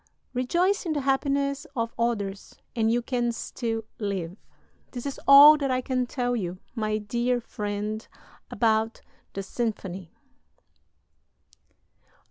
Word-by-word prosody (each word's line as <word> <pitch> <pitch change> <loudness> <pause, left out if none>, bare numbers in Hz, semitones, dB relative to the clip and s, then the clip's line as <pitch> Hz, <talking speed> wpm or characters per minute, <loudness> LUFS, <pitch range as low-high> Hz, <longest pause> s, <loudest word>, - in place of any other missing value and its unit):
Rejoice 345 +11 +1
in 320 - 0
the 290 - -1
happiness 275 +1 0
of 230 -2 -2
others 205 -4 -2 0.2
and 225 -1 +2
you 240 +1 +1
can 240 -1 0
still 225 -1 -4 0.2
live. 190 -5 -3 0.6
"This 245 0 -6
is 280 - -4
all 290 +2 +10
that 280 -2 -1
I 255 0 +1
can 255 -1 -1
tell 245 -1 -1
you, 185 -5 -3 0.2
my 215 -2 -1
dear 240 +4 0
friend, 210 -1 -4 0.4
about 225 -1 +1 0.3
the 195 - -4
symphony...." 195 -5 -4
235 Hz, 120 wpm, -26 LUFS, 215-260 Hz, 0.6 s, all